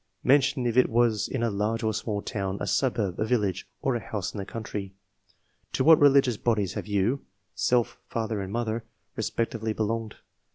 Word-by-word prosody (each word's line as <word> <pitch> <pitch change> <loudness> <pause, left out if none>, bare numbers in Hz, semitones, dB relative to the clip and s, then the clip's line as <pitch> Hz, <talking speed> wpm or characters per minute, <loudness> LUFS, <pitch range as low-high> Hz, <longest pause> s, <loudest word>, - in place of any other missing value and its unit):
Mention 135 -1 +3
if 120 0 0
it 130 - +5
was 115 -2 +2
in 125 -3 -2
a 115 - +1
large 105 +3 -1
or 110 0 +1
small 105 -1 -3
town, 95 -2 -3
a - - -2
suburb, 110 -9 0
a - - +2
village, 105 -5 0 0.2
or 135 - +2
a - - 0
house 105 -2 -4
in 105 - -5
the 100 - -4
country. 105 -4 -6 0.8
To - - +1
wliat 160 +1 +7
religious 135 -5 +5
bodies 105 -6 0
have - - -5
you 105 +7 0 0.3
(self, 115 +4 +1
father 110 -2 -2
and 95 0 -5
mother) 115 0 -2 0.3
respectively 110 0 -2
belonged 110 0 -2
110 Hz, 180 wpm, -27 LUFS, 105-120 Hz, 0.8 s, wliat